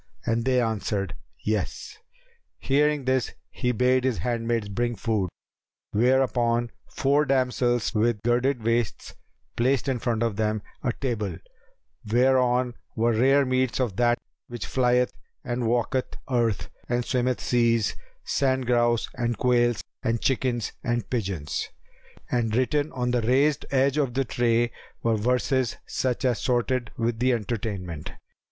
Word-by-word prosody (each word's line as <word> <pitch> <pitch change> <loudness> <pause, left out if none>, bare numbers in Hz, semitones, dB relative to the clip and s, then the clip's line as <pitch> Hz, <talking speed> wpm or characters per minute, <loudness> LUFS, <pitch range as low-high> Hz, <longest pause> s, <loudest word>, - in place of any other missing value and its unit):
and 115 0 0
they 130 -1 +3
answered, 105 -6 -1 0.3
"Yes." 105 - -2 0.6
Hearing 145 0 +1
this 130 -1 0 0.2
he 125 -2 -1
bade 125 +2 +2
his 130 -4 +1
handmaids 115 +2 -1
bring 120 +4 -1
food, 105 -5 -1 0.6
whereupon 120 0 +2 0.2
four 140 +2 +2
damsels 125 -4 +1
with 110 -1 +1
girded 120 +1 +1
waists 115 -1 -1 0.4
placed 130 +2 +1
in 130 -3 0
front 115 -1 0
of 115 -4 -1
them 110 -1 0 0.2
a 125 - 0
table, 110 -9 -3 0.7
whereon 125 0 +3 0.2
were 115 +1 +2
rare 135 +5 +4
meats 130 -1 +1
of 120 -7 0
that 120 0 +3 0.3
which 120 -1 -6
flieth 125 -1 +2 0.3
and 120 -1 -2
walketh 120 +2 0
earth 115 -5 +1 0.2
and 120 0 0
swimmeth 125 -1 0
seas, 115 -3 +2 0.3
sand 130 -2 +1
grouse 120 -1 +2
and 120 -2 -1
quails 120 -1 +2 0.2
and 115 0 0
chickens 125 -2 0
and 120 -2 -2
pigeons; 95 - -2 0.6
and 115 -3 +1
written 145 +4 +1
on 125 -1 -1
the 125 -1 +1
raised 135 +6 +2
edge 135 +1 +2
of 130 -4 0
the 135 0 +1
tray 120 0 +1 0.3
were 115 -1 +2
verses 125 +3 +1
such 130 0 -1
as 125 -3 +2
sorted 125 -1 0
with 115 0 -1
the 130 +2 +3
entertainment. 100 -8 -4
120 Hz, 135 wpm, -26 LUFS, 115-130 Hz, 0.7 s, rare